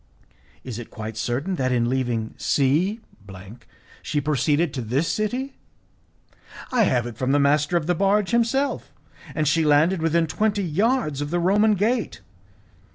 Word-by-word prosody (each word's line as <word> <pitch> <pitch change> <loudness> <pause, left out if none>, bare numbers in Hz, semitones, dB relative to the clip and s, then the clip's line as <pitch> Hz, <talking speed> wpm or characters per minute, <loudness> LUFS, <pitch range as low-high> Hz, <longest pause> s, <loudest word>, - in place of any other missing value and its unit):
"Is 120 -3 -6
it 120 - -9
quite 110 -1 -7
certain 135 - -2
that 130 -2 0
in 120 -1 +1
leaving 120 -3 -2
C 165 - +1 1.0
she 150 - -2
proceeded 150 +2 0
to 130 - -3
this 130 +8 -1
city?" 250 +6 -2 1.2
"I 240 -4 +3
have 125 -8 +1
it 120 -2 -8
from 130 +1 0
the 145 - +3
master 150 +4 +2
of 160 - -2
the 175 - +1
barge 195 +3 +1
himself, 235 +4 0 0.4
and 155 -2 0
she 160 +2 +2
landed 155 +4 +3
within 165 +1 +2
twenty 205 +5 0
yards 185 - 0
of 145 - -3
the 175 - -1
Roman 205 +4 +3
gate. 225 +4 -1
155 Hz, 155 wpm, -23 LUFS, 130-205 Hz, 1.2 s, I